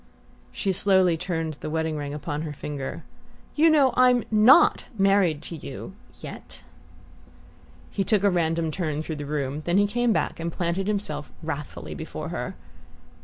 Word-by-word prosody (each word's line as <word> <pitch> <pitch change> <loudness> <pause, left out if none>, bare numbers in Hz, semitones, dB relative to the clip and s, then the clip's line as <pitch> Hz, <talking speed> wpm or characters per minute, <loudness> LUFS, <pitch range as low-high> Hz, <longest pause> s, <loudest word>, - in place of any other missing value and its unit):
She 195 - -1
slowly 185 -2 +4
turned 165 -3 -3
the - - -5
wedding 160 0 -1
ring 145 -1 -4
upon 145 0 -4
her 155 -2 -4
finger. 140 -1 -6 0.5
"You 320 +2 +5
know 285 -4 +4
I'm 250 -2 +5
NOT 220 +9 +6
married 195 -6 +3
to 170 - -6
you 140 +5 -8 0.3
yet!" - - -10 1.3
He 195 - 0
took 200 +1 +1
a 200 - +4
random 165 -2 0
turn 155 -2 -2
through 160 -1 -5
the 145 -1 -6
room; 145 0 -2
then 175 +2 +2
he 205 - +5
came 240 +3 +1
back 215 - -1
and 170 +1 -3
planted 175 +3 -2
himself 155 -9 -2
wrathfully 140 - -5
before 75 - -6
her. - - -4
170 Hz, 160 wpm, -25 LUFS, 150-200 Hz, 1.3 s, NOT